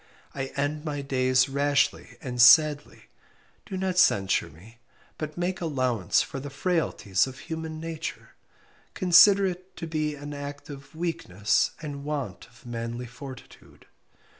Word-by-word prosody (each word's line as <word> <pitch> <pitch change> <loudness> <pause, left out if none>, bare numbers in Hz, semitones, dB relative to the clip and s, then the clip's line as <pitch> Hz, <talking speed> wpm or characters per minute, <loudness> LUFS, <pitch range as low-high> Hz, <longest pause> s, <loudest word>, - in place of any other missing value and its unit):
I 135 -1 -3
end 145 +2 -2
my 145 -3 -4
days 130 -1 +2
rashly 140 +1 0
and 125 -2 -1
sadly, 150 +4 +6 0.6
do 190 - -5
not 185 -1 0
censure 100 - +3
me, 105 +10 -17 0.4
but 155 0 -5
make 180 +1 -2
allowance 130 - +1
for 135 - -7
the 145 +2 -7
frailties 140 - 0
of 130 0 -9
human 160 -1 -6
nature, 165 0 -6 0.6
consider 195 +2 +6
it 185 0 -5
to 165 - -5
be 155 -2 -2
an 145 +1 -8
act 145 +1 -7
of 140 +2 -12
weakness 120 - 0
and 140 -2 -6
want 140 -11 -4
of 120 +1 -22
manly 120 +1 -5
fortitude. 130 +2 -12
145 Hz, 140 wpm, -26 LUFS, 125-160 Hz, 0.6 s, sadly